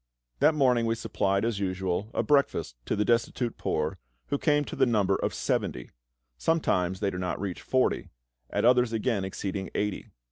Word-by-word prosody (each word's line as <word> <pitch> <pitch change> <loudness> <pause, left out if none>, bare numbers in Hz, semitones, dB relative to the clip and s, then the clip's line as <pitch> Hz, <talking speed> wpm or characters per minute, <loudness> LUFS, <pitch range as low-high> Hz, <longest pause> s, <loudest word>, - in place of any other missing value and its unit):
That 155 +3 +4
morning 125 -5 +3
we 115 - +1
supplied, 100 -2 0
as 115 -4 -1
usual, 95 +1 -2
a - - +1
breakfast 140 - +1
to - - +1
the 105 - +1
destitute 120 0 0
poor, - - -1 0.3
who 140 - 0
came 145 -2 +2
to - - -6
the 135 -1 +3
number 105 -5 +2
of - - -1
seventy. - - -2 0.5
Sometimes 95 - +1
they 100 -2 +1
do 90 - -5
not 90 -1 -2
reach 95 -2 -4
forty, 130 -1 +1 0.4
at - - 0
others 125 -1 +4
again 110 -2 0
exceeding 95 0 -4
eighty. 105 -1 -2
110 Hz, 175 wpm, -28 LUFS, 95-125 Hz, 0.5 s, That